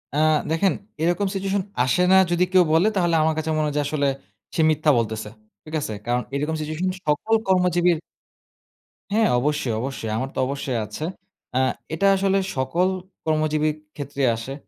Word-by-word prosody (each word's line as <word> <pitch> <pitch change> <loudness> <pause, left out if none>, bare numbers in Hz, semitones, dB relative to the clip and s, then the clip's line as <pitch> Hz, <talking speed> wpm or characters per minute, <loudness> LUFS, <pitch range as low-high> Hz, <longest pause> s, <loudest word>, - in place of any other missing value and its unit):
আ - - 0 0.3
দেখেন 185 +4 +2 0.3
এরকম 175 +4 +1
সিচুয়েশন 195 0 -1 0.2
আসে 130 +8 +2
না - - +7 0.2
যদি 175 +1 +3
কেউ 185 -1 +7
বলে 170 +6 +4
তাহলে 175 -3 +2
আমার 160 0 +2
কাছে 155 0 -2
মনে 155 0 +1
হয় 145 - -4
যে - - +3
আসলে 145 -1 0 0.5
সে 160 - +2
মিথ্যা 155 0 +3
বলতেছে। 110 -1 -2 0.4
ঠিক 155 - -11
আছে? 110 - -3
কারণ 120 +1 +1
এরকম 150 +3 -1
সিচুয়েশন 155 +4 -2 0.2
সকল 150 +10 +1
কর্মজীবীর 180 -2 +3 1.1
হ্যাঁ 220 0 +3
অবশ্যই, 145 -4 0
অবশ্যই। 130 -4 -4
আমার 130 +3 -2
তো - - -2
অবশ্যই 135 -3 -2
আছে। 105 +9 -7 0.5
আ - - +4 0.3
এটা 195 +5 +2
আসলে 195 0 +2 0.2
সকল 165 +8 +1 0.4
কর্মজীবী 155 -1 +1 0.3
ক্ষেত্রেই 140 -2 -1
আসে। 115 +4 -6
155 Hz, 165 wpm, -23 LUFS, 140-180 Hz, 1.1 s, না